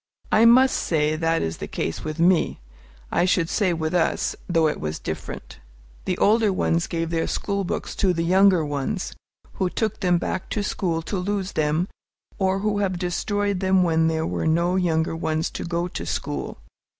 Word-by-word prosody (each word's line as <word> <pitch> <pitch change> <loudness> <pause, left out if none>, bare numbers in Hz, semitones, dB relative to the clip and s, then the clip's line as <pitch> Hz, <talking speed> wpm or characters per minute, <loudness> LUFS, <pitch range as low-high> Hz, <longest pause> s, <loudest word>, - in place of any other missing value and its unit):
I 220 - +5
must 255 +3 +6
say 155 -2 +1
that 165 +1 +1
is 80 0 -3
the - - -6
case 80 - -3
with 155 0 -4
me, 175 +1 +3 0.5
I 175 - +2
should 180 -3 +2
say 195 -4 +1
with 160 -1 -2
us, 175 -2 +1
though 165 -2 +3
it 150 - -2
was 75 0 -3
different. - - -7 0.5
The 185 - -1
older 215 0 +3
ones 170 -2 0
gave 165 -1 -2
their 165 -1 0
school 200 -1 -2
books 180 - -3
to 190 - +3
the 165 -1 -1
younger 185 -1 +4
ones, 145 -2 -3 0.5
who 185 - +2
took 215 +2 -2
them 180 -2 +2
back 180 - -3
to 205 - 0
school 170 -5 -1
to 180 +5 -3
lose 195 +1 -2
them, 155 +4 0 0.5
or 190 0 +1
who 205 -1 0
have 190 -3 0
destroyed 200 +2 -1
them 190 -1 +3
when 160 -2 +2
there 160 0 0
were - - -2
no 170 +3 +2
younger 165 -3 +1
ones 160 0 -1
to - - -5
go 170 0 -1
to 85 - -5
school. 70 -4 -3
175 Hz, 185 wpm, -24 LUFS, 160-190 Hz, 0.5 s, must